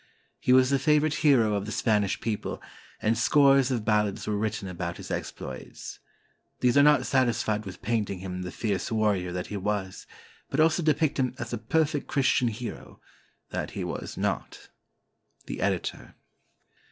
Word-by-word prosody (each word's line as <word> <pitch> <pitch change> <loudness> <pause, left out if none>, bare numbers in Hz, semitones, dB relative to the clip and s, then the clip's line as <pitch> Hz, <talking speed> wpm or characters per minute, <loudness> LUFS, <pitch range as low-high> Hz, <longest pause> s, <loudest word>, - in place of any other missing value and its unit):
He - - +1
was 130 +1 +5
the 140 - +3
favorite 150 0 +3
hero 125 -8 +4
of 100 0 -2
the - - -4
Spanish 105 -4 +1
people, 110 -3 -3 0.4
and 110 +1 +3
scores 135 +2 +4
of 120 -5 -1
ballads 105 -2 +1
were 105 - -1
written 105 -1 -2
about 85 -1 -4
his - - -8
exploits. 65 -1 -6 0.6
These 125 0 +3
are 145 - +7
not 150 0 +5
satisfied 115 -5 +1
with 95 -1 -9
painting 105 -4 -1
him 90 0 -5
the 90 - -5
fierce 100 -3 -2
warrior 105 -5 +1
that 90 0 -3
he - - -2
was, 100 -1 -3 0.4
but - - -2
also 160 +2 +4
depict 155 -2 +1
him 130 -1 0
as 120 -2 -5
the 120 - -3
perfect 145 +4 0
Christian 130 -2 +2
hero, 115 +2 -6 0.5
that - - -3
he - - -2
was - - -5
not. - - -3 0.8
The - - -5
Editor. - - -2
110 Hz, 165 wpm, -27 LUFS, 100-135 Hz, 0.8 s, are